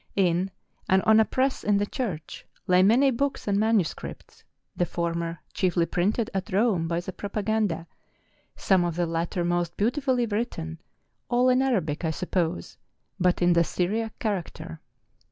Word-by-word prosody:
In, 185 -1 +2 0.4
and 190 0 +4
on 220 0 +6
a 220 - +5
press 260 +3 0
in 205 -1 +3
the 205 - +1
church, 200 - -5 0.2
lay 180 -1 +4
many 245 +8 +5
books 275 +1 -2
and 200 0 +2
manuscripts, 215 -6 -1 0.3
the 175 - 0
former 170 0 -2 0.2
chiefly 180 -2 +1
printed 205 +7 0
at 190 -1 -2
Eome 195 -5 +1
by 170 0 -1
the 185 +1 -7
Propaganda, 205 -4 -1 0.7
some 190 -2 +2
of 170 -2 -2
the 175 0 +1
latter 170 +2 -2
most 175 -1 -1
beautifully 250 +2 +1
written,—all 230 - -3
in 255 +1 +4
Arabic, 180 - 0
I 160 - +1
suppose, 160 - -2 0.4
but 180 0 +2
in 175 0 +5
the 170 0 +4
Syriac 215 +7 -2
character. 170 -6 -4
190 Hz, 150 wpm, -26 LUFS, 170-220 Hz, 0.7 s, on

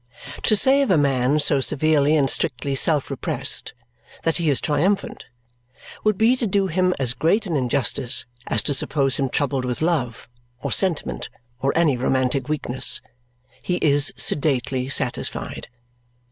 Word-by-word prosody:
To 215 - +2
say 270 +7 +5
of 275 - 0
a 185 - +4
man 140 0 +1
so 145 -2 +4
severely 150 +1 +2
and 140 -3 +2
strictly 135 0 -1
self 145 +1 +1
repressed - - -1 0.5
that 165 -3 0
he 165 -3 0
is 135 -4 +1
triumphant 170 +7 -1 0.8
would 215 -2 +1
be 225 +4 +3
to 240 - -2
do 195 0 +1
him 185 +1 0
as 125 -3 -1
great 175 - 0
an 170 -5 -3
injustice 130 -1 0 0.2
as - - 0
to 145 - -1
suppose 135 0 +1
him 135 -1 -1
troubled 135 -1 -1
with 125 -1 -4
love 135 -8 -2 0.3
or - - -5
sentiment 155 - -1 0.3
or 135 - 0
any 155 -6 +2
romantic 130 +2 -1
weakness. 135 -4 0 0.6
He 180 - -2
is 145 -4 +3
sedately 130 -3 +1
satisfied. 130 -3 -2
145 Hz, 150 wpm, -21 LUFS, 130-170 Hz, 0.8 s, say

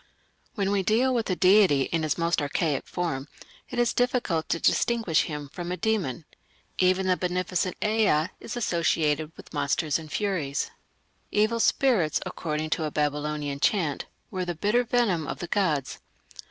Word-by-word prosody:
When 200 -2 0
we 200 -1 +2
deal 235 +7 +2
with 230 -4 -1
a 185 - +1
deity 185 -7 +5
in 165 +4 -1
his 155 -1 0
most 170 -1 +1
archaic 145 0 -1
form 150 -6 -3 0.4
it - - -6
is 240 -1 +2
difficult 245 -10 0
to 165 - 0
distinguish 225 -8 +2
him 150 -2 -5
from 175 +5 -6
a 180 - -2
demon. 175 - -1 0.5
Even 185 +1 +3
the 185 -1 +3
beneficent 180 0 -1
Ea 210 -7 +2
is 230 - -6
associated 160 -6 +1
with - - -13
monsters 145 +1 0
and 155 -2 -10
furies. 165 -9 -1 0.6
"Evil 215 +2 +2
spirits", 225 - +2
according 155 -1 -3
to 160 - 0
a - - -1
Babylonian 150 -1 -2
chant, 160 -5 +1 0.3
were 185 -1 -2
"the 175 -1 -3
bitter 210 +9 +2
venom 225 -10 +1
of - - -4
the - - -5
gods". 165 -8 0
175 Hz, 160 wpm, -26 LUFS, 150-205 Hz, 0.6 s, deity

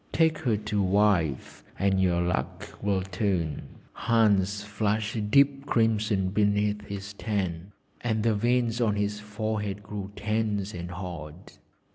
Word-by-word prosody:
Take 160 -1 +3
her 120 -8 +1
to 105 -1 -1
wife, 95 -7 +1
and 95 0 +2
your 90 -2 +2
luck 90 +1 -3
will 100 -2 +1
turn.' 90 -5 -1 0.3
Hans 105 -3 +2
flushed 105 +1 -1
deep 140 +2 +4
crimson 105 -5 +2
beneath 105 +1 +1
his 100 0 -6
tan, 95 -4 -3 0.3
and 110 -2 0
the 115 -1 +3
veins 120 +2 +1
on 110 -3 +2
his 105 0 -1
forehead 105 -1 -3
grew 100 -1 -6
tense 105 -1 -1
and 85 0 -6
hard. 85 -2 -8
105 Hz, 130 wpm, -27 LUFS, 95-110 Hz, 0.3 s, deep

